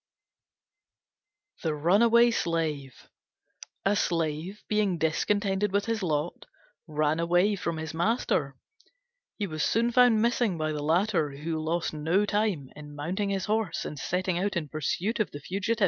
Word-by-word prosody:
THE 155 -2 -1
RUNAWAY 230 +9 +5
SLAVE 155 - -2 0.8
A 200 +1 +3
Slave, 165 +2 -1
being 210 -4 +1
discontented 195 +5 0
with 200 +1 +1
his 225 -1 -1
lot, 155 -2 -2 0.4
ran 155 0 0
away 175 +5 +3
from 170 -3 -3
his 160 0 -5
master. 165 - 0 0.8
He 205 - -1
was 155 -4 -4
soon 235 +2 +1 0.3
missed 235 +2 +2 0.2
by 155 0 -1
the 150 -1 -3
latter, 160 -2 +1
who 160 +1 -3
lost 165 +1 -1
no 165 +7 +1
time 205 -10 0
in 145 0 -10
mounting 180 +8 -2
his 195 -1 -1
horse 215 -5 -1
and 150 - -6
setting 180 +1 -1
out 200 +1 -1
in 155 -4 -3
pursuit 175 - -2
of 215 - +1
the 145 - -8
fugitive. 200 +8 -2
175 Hz, 145 wpm, -28 LUFS, 155-205 Hz, 0.8 s, RUNAWAY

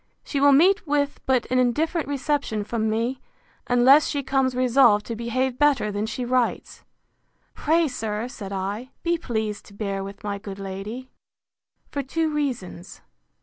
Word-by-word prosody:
She 280 - -2
will 285 +1 +6
meet 360 +7 +4
with 285 0 0
but 255 -2 +2
an 255 - +3
indifferent 300 +6 +1
reception 280 -6 -1
from 220 +1 -1
me, 230 +4 -1 0.5
unless 255 +5 +6
she 285 -1 -2
comes 265 -1 +1
resolved 245 -4 +4
to 230 - -4
behave 245 +3 -2
better 285 -8 +3
than 205 +2 -2
she 245 +3 -4
writes. 250 -1 -1 0.7
Pray, 325 +2 +2
sir, 225 -3 -3
said 205 -6 -8
I, 200 +6 -4
be 340 0 +1
pleased 220 -7 -3
to 200 - -15
bear 200 -2 -3
with 200 +2 -9
my 205 -1 -3
good 200 -1 -8
lady, 200 +6 -7 0.8
for 285 - -2
two 315 +4 -1
reasons. 245 - -4
250 Hz, 155 wpm, -24 LUFS, 210-280 Hz, 0.8 s, will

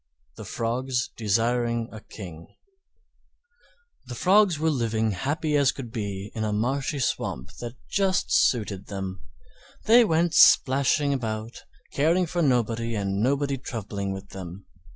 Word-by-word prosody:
THE - - -9
FROGS 125 +2 -2
DESIRING 115 +2 0
A 110 - -9
KING 85 -8 -10 1.6
The 125 - -6
Frogs 190 - +4
were 160 +1 +1
living 110 -5 0
as - - -7
happy 150 +2 -1
as 140 -2 +4
could 125 -5 -8
be 100 -2 -5
in 110 - -3
a 110 - -1
marshy 135 +7 -1
swamp 65 - -2
that 120 0 -6
just 195 -1 0
suited 105 -5 +1
them; 95 -2 -5 0.6
they 235 +3 +7
went 170 -4 +1
splashing 140 -1 +5
about 110 -3 -4 0.3
caring 165 +6 +2
for 175 +1 -2
nobody 115 -4 +1
and 100 -1 -1
nobody 140 +2 0
troubling 100 -6 -5
with 95 +1 -7
them. 95 0 -9
120 Hz, 135 wpm, -25 LUFS, 105-140 Hz, 1.6 s, they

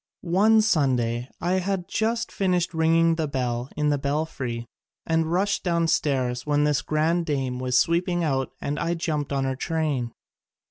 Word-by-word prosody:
One 210 +6 +4
Sun 150 - +3
day 120 +1 -2
I 180 +2 +1
had 185 -1 -2
just 225 +2 -1
finished 180 -2 0
ringing 165 0 +3
the 160 -2 0
bell 125 -2 -2
in 150 0 +1
the 145 -1 +1
belfry 140 -5 -3 0.4
and 160 0 +1
rushed 200 +3 +1
downstairs 145 -8 0
when 145 +1 +1
this 150 -1 +2
grand 165 +3 0
dame 135 -4 -1
was 125 -1 +1
sweeping 175 +3 +1
out 135 -4 0
and 145 +1 -3
I 170 +1 0
jumped 150 -4 -2
on 135 -1 0
her 135 0 -1
train. 145 -5 -1
155 Hz, 160 wpm, -25 LUFS, 135-170 Hz, 0.4 s, One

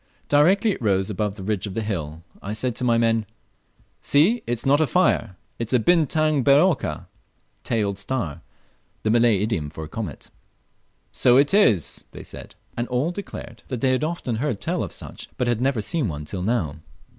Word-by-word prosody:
Directly 190 +10 +4
it 185 - -5
rose 95 -2 +1
above 105 0 -2
the 100 - -8
ridge 105 0 -2
of 100 - -7
the 115 - -1
hill, 80 -6 -4 0.2
I 105 - -4
said 115 +2 -1
to - - -3
my 120 -2 +3
men, 115 -2 +1 0.7
"See, 185 +12 +3
it's 120 +1 -2
not 145 +3 +4
a 155 - +3
fire, 180 - +1 0.2
it's 115 +1 -2
a 125 - +5
bintang 155 +1 +3
ber 140 +1 +6
ekor" 150 - +1 0.6
("tailed 100 -4 -1
star," 95 - -3 0.6
the 110 - +2
Malay 115 -2 +4
idiom 105 -10 -1
for 80 +1 -8
a - - -7
comet). 110 +6 -7 0.8
"So 125 0 +4
it 145 +5 +3
is," 110 - +3 0.2
said - - -9 0.2
they; - - -2
and 120 - -2
all 125 +7 0
declared 175 - -8
that 125 -3 -4
they 130 - +3
had 130 +3 +1
often 155 -8 -2
heard 125 -4 -1
tell 100 - -1
of - - -4
such, - - -8
but 125 - 0
had 120 -1 0
never 130 -3 +1
seen 125 +6 0
one 75 -3 -5
till 90 +4 -5
now. 95 -8 -1
115 Hz, 190 wpm, -23 LUFS, 100-140 Hz, 0.8 s, ber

